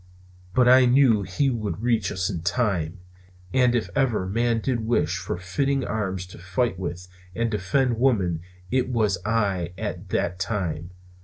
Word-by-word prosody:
But 125 -1 +5
I 130 +1 +7
knew 120 -4 +5
he 100 +9 0
would 110 -2 -3
reach 115 -6 +1
us 95 -2 -1
in 85 - -3
time! 90 -4 0 0.6
And 125 -2 +4
if 120 - 0
ever 125 -8 +1
man 115 +4 +1
did 125 +1 -1
wish 110 -6 0
for 90 -1 -4
fitting 135 +10 -1
arms 95 -4 -2
to - - -11
fight 95 +2 -1
with 90 0 -5 0.3
and 115 0 0
defend 115 +4 +1
woman 95 -11 +2 0.3
it 130 -1 +1
was 105 -7 +1
I 100 -5 0
at 95 -3 -5
that 90 0 -1
time. 85 -4 -2
105 Hz, 160 wpm, -25 LUFS, 90-120 Hz, 0.6 s, I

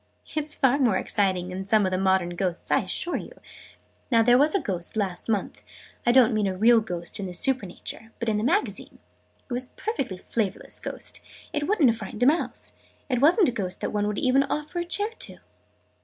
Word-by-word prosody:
"It's 305 0 0
far 265 +1 +3
more 235 -8 +3
exciting 185 -4 0
than 190 +1 -6
some 215 -1 +3
of 185 - -1
the 185 - 0
modern 190 -2 +2
ghosts, 175 0 -2
I - - +4
assure 350 - -2
you! - - -10 0.7
Now 230 -3 +4
there 245 +1 +5
was 295 +6 +4
a - - +3
Ghost 180 - -3
last 195 -1 -2
month 210 -3 -2 0.5
I - - +7
don't 245 -2 +5
mean 215 -2 +1
a 185 -1 -3
real 230 +3 +5
Ghost 175 -5 -4
in 195 - -3
in 180 - -7
Supernature 225 0 -2
but 235 - -4
in 210 -1 +1
a - - -2
Magazine. 345 - 0 0.5
It 250 - -6
was 250 +1 -1
a - - -29
perfectly 275 - -3
flavourless 205 0 -1
Ghost. - - -1 0.3
It 295 0 -1
wouldn't 345 - +4
have 225 - -5
frightened 215 - -4
a - - +5
mouse! 305 +6 +2 0.4
It 250 -2 0
wasn't 340 - +5
a - - -1
Ghost 190 -6 -4
that - - -2
one 205 0 0
would 210 -1 -2
even 260 +1 +3
offer 300 +4 -3
a 345 - -2
chair 410 +5 0
to!" - - -7
225 Hz, 215 wpm, -25 LUFS, 190-275 Hz, 0.7 s, I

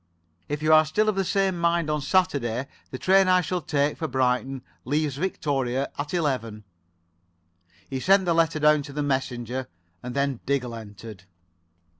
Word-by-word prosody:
If 150 +1 -3
you 155 0 +4
are 155 0 +8
still 210 +8 +1
of 210 - 0
the 195 - +1
same 190 -1 0
mind 170 -1 +1
on 150 -1 -1
Saturday, 140 -8 +1 0.2
the 130 - -6
train 190 +5 +4
I 185 0 +5
shall 180 +2 -2
take 145 -1 0
for 160 - -1
Brighton 130 0 0 0.2
leaves 145 0 -1
Victoria 140 -6 -1
at 145 +1 -4
eleven." 125 -11 -2 1.2
He 135 - -4
sent 190 +6 +4
the 170 - +2
letter 165 -1 +2
down 150 0 +4
to 140 0 -9
the 150 +1 -2
messenger, 130 -2 -2 0.3
and 125 0 -6
then 140 -3 0
Diggle 130 -4 0
entered. 105 -3 -10
145 Hz, 165 wpm, -25 LUFS, 130-170 Hz, 1.2 s, are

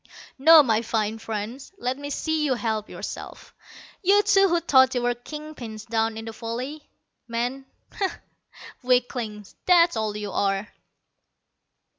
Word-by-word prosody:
No, 320 +2 +9
my 225 -4 +2
fine 220 -1 -1
friends, 225 - -6
let 250 -6 -2
me 285 +1 -7
see 315 +1 -1
you 275 -4 +1
help 220 -3 -2
yourselves, - - -8 0.5
you 405 +2 +4
two 390 -1 +4
who 345 0 +2
thought 260 -5 +4
you 245 - 0
were 245 0 +2
king 300 +6 -9
pins 220 -6 -8
down 225 -1 0
in 225 - -6
the 225 - -5
valley. 250 +7 -6 0.4
Men? 245 +3 -3 0.2
Bah! 395 - -1 0.7
Weaklings, 245 -5 -1
that's 345 -3 +5
all 215 -1 -2
you 205 -1 -5
are!" 195 +1 0
245 Hz, 145 wpm, -25 LUFS, 220-300 Hz, 0.7 s, No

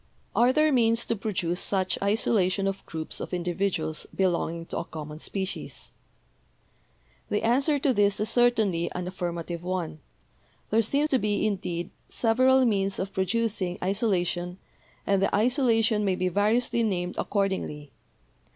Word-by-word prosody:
Are 245 +2 +5
there 305 +2 +3
means 230 -2 +3
to 230 - -1
produce 185 -4 -2
such 190 -2 +1
isolation 200 -2 +1
of 195 0 -3
groups 160 -1 -4
of - - -4
individuals 175 -3 -2
belonging 170 -3 0
to - - -4
a - - -3
common 155 -2 -8
species? 190 +3 -5 1.4
"The 210 - 0
answer 270 +6 +3
to 275 -1 +2
this 205 -2 +2
is 215 - 0
certainly 220 -9 +2
an 180 0 -4
affirmative 175 -2 -4
one. 180 -4 -3 0.7
There 225 +2 +4
seem 280 +7 +1
to 265 - +3
be, 210 -1 0
indeed, 180 -4 -2 0.2
several 255 +3 +3
means 195 -4 +1
of 195 +1 -4
producing 190 -1 0
isolation, 180 -3 0 0.5
and 195 -1 +2
the - - +2
isolation 225 -2 +2
may 190 -2 +1
be 185 0 0
variously 220 +5 +1
named 180 -5 -1
accord 200 -2 +1
ingly. 150 -6 -5
195 Hz, 140 wpm, -27 LUFS, 180-225 Hz, 1.4 s, Are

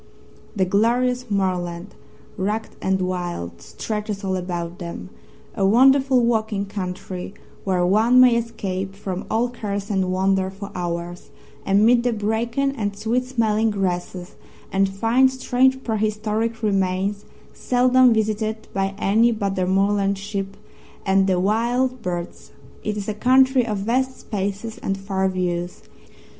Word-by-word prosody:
The 190 -2 +2
glorious 245 +5 +1
moorland, 180 -2 -2 0.4
rugged 210 +3 -2
and 190 0 0
wild, 175 - -4
stretches 210 -2 -5
all 190 -1 -1
about 175 -1 -4
them 175 +1 -7 0.4
a 200 - -2
wonderful 265 +5 +5
walking 220 -3 0
country, 185 -1 -6 0.3
where 185 -2 +1
one 220 +7 +4
may 250 -2 +7
escape 195 -5 -3
from 190 -2 -5
all 230 +2 +1
cares 205 -4 -4
and 190 -2 0
wander 190 0 +1
for 195 +1 -9
hours 175 0 -5 0.4
amid 220 +5 +5
the 245 0 0
bracken 230 +6 0
and 205 -4 -2
sweet 230 +4 0
smelling 225 -3 +1
grasses 180 -2 -3 0.4
and 195 0 +2
find 230 +7 +3
strange 260 0 +1
prehistoric 220 +1 -1
remains 195 0 0 0.3
seldom 255 0 +4
visited 220 0 -1
by 195 0 -1
any 225 +4 +3
but 200 -3 -1
the 185 -2 -1
moorland 200 +1 +2
sheep 195 -1 -5 0.5
and 195 0 +3
the 185 -2 +2
wild 240 +6 0
birds. 175 -3 -5 0.3
It 210 0 -2
is 200 - -4
a 215 - -1
country 255 +2 +4
of 210 -2 -1
vast 255 +6 -1
spaces 205 +2 -4
and 195 - -2
far 195 -1 -1
views. 175 -1 -3
205 Hz, 135 wpm, -22 LUFS, 190-230 Hz, 0.5 s, may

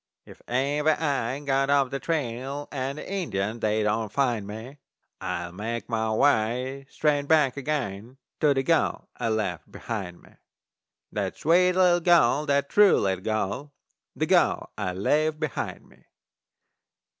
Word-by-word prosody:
If - - -15
ever 145 +5 +1
I 135 -5 -1
get 135 0 +1
off 140 -2 +3
the 140 - -2
trail 140 -2 -3
And 135 0 -3
the - - -7
Indians 115 - -2
they 110 0 +1
don't 105 0 0
find 120 -7 0
me, 115 +7 -9 0.4
I'll 85 0 -3
make 115 +5 -5
my 110 -1 0
way 130 +3 +1
straight 145 -2 0
back 150 -5 +4
again 130 -5 -4 0.2
To 150 - +4
the 135 - +1
gal 165 +2 +1
I 120 -2 -1
left 105 -7 -2
behind 95 -7 -6
me. - - -21 0.7
That - - -3
sweet 180 +3 +4
little 180 -1 +4
gal, 160 -4 +4
that 140 0 +2
true 205 +3 +5
little 95 -2 -1
gal, 110 +6 -2 0.4
The - - 0
gal - - +2
I 95 -3 -3
left 150 +11 +1
behind 155 -1 -4
me! - - -23
135 Hz, 145 wpm, -26 LUFS, 110-150 Hz, 0.7 s, true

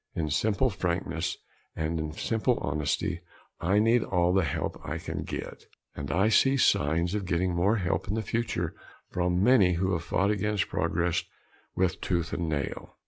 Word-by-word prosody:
In 75 -3 -1
simple 110 - +2
frankness 85 -2 -2 0.4
and 80 +1 -2
in 80 0 -3
simple 115 +7 0
honesty, 85 +4 -1 0.4
I 95 +4 +2
need 115 +2 +4
all 90 -1 +1
the 95 -1 +3
help - - -3
I - - -3
can - - -5
get - - -6 0.3
and 70 -1 -5
I 95 +5 +3
see 135 +5 +4
signs 85 - +2
of 100 -3 -2
getting 90 +1 +1
more 95 +6 +2
help 90 -3 -1
in 100 - -1
the 110 - -1
future 115 +3 -2 0.4
from 90 +1 +1
many 105 -8 +5
who 95 +2 0
have 85 - 0
fought 100 +2 +1
against 105 0 0
progress 85 +1 0 0.5
with 95 -1 0
tooth 85 -3 -1
and 85 -2 -1
nail. 70 -3 -4
90 Hz, 170 wpm, -28 LUFS, 85-105 Hz, 0.5 s, many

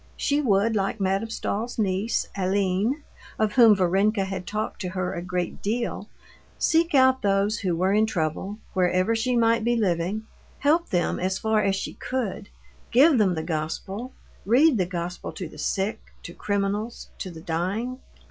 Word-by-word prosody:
She 290 +1 +1
would, 220 -3 +2
like 195 +2 -1
Madame 195 +3 0
Stahl's 225 +1 -3
niece, 205 +1 0
Aline, 200 +7 0 0.3
of 215 -1 +1
whom 230 -4 +7
Varenka 195 +3 +2
had 190 -1 -5
talked 215 +1 -3
to 185 - -3
her 185 0 -2
a 170 - -4
great 180 -1 -3
deal, 235 +3 -2 0.5
seek 330 -1 +2
out 260 -1 +5
those 200 +1 +1
who 180 -3 0
were 185 +3 +1
in 215 +1 +3
trouble, 185 +2 -2 0.2
wherever 185 +3 +2
she 245 +2 0
might 230 -1 +3
be 240 +1 +2
living, 195 0 0 0.3
help 320 +5 +2
them 175 -3 0
as 190 +1 -1
far 220 -1 +1
as 195 -2 +1
she - - -4
could, 250 - -4 0.4
give 275 +2 +5
them 190 -4 +3
the 160 - -3
Gospel, 175 +9 -4 0.3
read 250 +4 +4
the 180 - +1
Gospel 175 0 -5
to 185 - -5
the - - -13
sick, 205 +3 -1 0.2
to 170 - -8
criminals, 205 +3 -2
to 185 - -4
the 165 -2 -10
dying. 195 +11 -2
200 Hz, 165 wpm, -25 LUFS, 185-230 Hz, 0.5 s, whom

